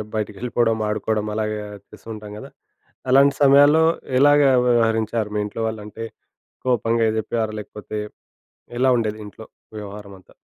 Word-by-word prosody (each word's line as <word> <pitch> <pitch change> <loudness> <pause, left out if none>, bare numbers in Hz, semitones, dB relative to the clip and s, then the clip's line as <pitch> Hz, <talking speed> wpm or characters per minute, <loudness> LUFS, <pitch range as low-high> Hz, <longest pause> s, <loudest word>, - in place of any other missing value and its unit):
బయటికెళ్ళిపోవడం, 110 +2 -1
ఆడుకోవడం 105 0 -2
అలాగా 110 -1 -2 0.3
చేస్తూ 115 - -15
ఉంటాం 105 -1 -10
గదా! - - -10 0.6
అలాంటి 140 +1 +5
సమయాల్లో 145 +3 +6 0.3
ఎలాగా 145 0 +5 0.2
వ్యవహరించారు 115 -2 +1
మీ - - 0
ఇంట్లో 115 +2 -5
వాళ్ళు? 110 -1 -5
అంటే 110 +2 -7 0.6
కోపంగా 115 -2 +1
జెప్పారా? 110 0 -2
లేకపోతే 105 +1 -8 0.8
ఎలా 130 0 +4
ఉండేది 110 -2 -2
ఇంట్లో 110 +2 -12 0.3
వ్యవహారమంతా? 100 -2 -11
110 Hz, 120 wpm, -21 LUFS, 105-120 Hz, 0.8 s, సమయాల్లో